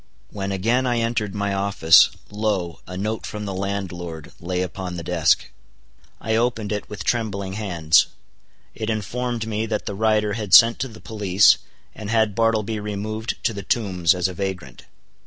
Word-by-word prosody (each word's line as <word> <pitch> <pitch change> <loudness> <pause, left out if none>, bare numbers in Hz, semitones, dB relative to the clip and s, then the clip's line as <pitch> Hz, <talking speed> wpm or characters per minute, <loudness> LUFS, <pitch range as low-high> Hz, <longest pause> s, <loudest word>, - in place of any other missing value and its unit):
When 100 -1 -4
again 115 +7 +1
I 120 -1 +1
entered 115 -3 -1
my 100 -1 -1
office, 95 -4 +5 0.2
lo, 105 -5 -2
a 90 0 -7
note 110 +3 -3
from 105 0 -6
the 100 - -4
landlord 90 -5 -5
lay 90 +1 -2
upon 90 0 -5
the 85 - -5
desk. 85 -3 +1 0.7
I 110 0 -1
opened 115 -2 0
it 105 -1 -3
with 105 -3 -6
trembling 100 -4 -1
hands. 85 -7 +3 0.7
It 110 0 -4
informed 115 +2 -2
me 110 0 -2
that 110 -1 -2
the 100 - -3
writer 105 0 +1
had 105 -3 +3
sent 115 0 +7
to 135 - -1
the 110 -3 -13
police, 100 -3 +4 0.3
and 105 -2 -7
had 110 -2 +2
Bartleby 110 -1 +1
removed 105 +2 -4
to 115 - +1
the 100 - -5
Tombs 95 -4 +1
as 90 0 +1
a 95 - -6
vagrant. 90 -9 -5
105 Hz, 170 wpm, -22 LUFS, 95-110 Hz, 0.7 s, sent